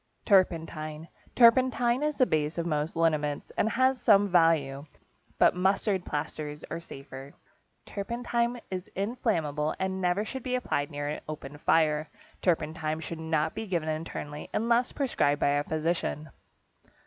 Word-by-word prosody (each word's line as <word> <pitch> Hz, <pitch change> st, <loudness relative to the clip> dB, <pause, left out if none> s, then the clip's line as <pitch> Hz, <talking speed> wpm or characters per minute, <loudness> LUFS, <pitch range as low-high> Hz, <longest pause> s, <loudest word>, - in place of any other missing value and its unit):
=Turpentine.= 165 Hz, -5 st, +1 dB, 0.3 s
Turpentine 245 Hz, +1 st, +5 dB
is 300 Hz, -1 st, -1 dB
the 255 Hz, -, +5 dB
base 155 Hz, -4 st, -1 dB
of 170 Hz, -, -1 dB
most 155 Hz, -1 st, -1 dB
liniments, 155 Hz, -3 st, 0 dB
and -, -, +2 dB
it -, -, 0 dB
has 260 Hz, 0 st, +3 dB
some 205 Hz, -2 st, +5 dB
value, 160 Hz, -6 st, +3 dB, 0.5 s
but -, -, +5 dB
mustard 190 Hz, +1 st, +1 dB
plasters 150 Hz, 0 st, -4 dB
are 170 Hz, -, -3 dB
safer. 135 Hz, -3 st, -10 dB, 0.5 s
Turpentine 235 Hz, +3 st, -2 dB
is 185 Hz, -1 st, -4 dB
inflammable, 170 Hz, -, -1 dB
and 190 Hz, 0 st, -2 dB
never 180 Hz, +3 st, +1 dB
should 265 Hz, +3 st, -5 dB
be 255 Hz, +1 st, -2 dB
applied 155 Hz, -12 st, -1 dB
near 145 Hz, -1 st, -4 dB
an 150 Hz, -, -4 dB
open 145 Hz, -1 st, -7 dB
fire. 155 Hz, -1 st, +2 dB, 0.3 s
Turpentine 160 Hz, -2 st, 0 dB
should 165 Hz, 0 st, -6 dB
not 160 Hz, -1 st, 0 dB
be 220 Hz, -, -5 dB
given 170 Hz, -4 st, -1 dB
internally, 155 Hz, -1 st, -5 dB
unless 235 Hz, +2 st, +2 dB
prescribed 145 Hz, -, +1 dB
by -, -, +3 dB
a 145 Hz, 0 st, +1 dB
physician. 155 Hz, -1 st, -2 dB
165 Hz, 145 wpm, -28 LUFS, 150-210 Hz, 0.5 s, Turpentine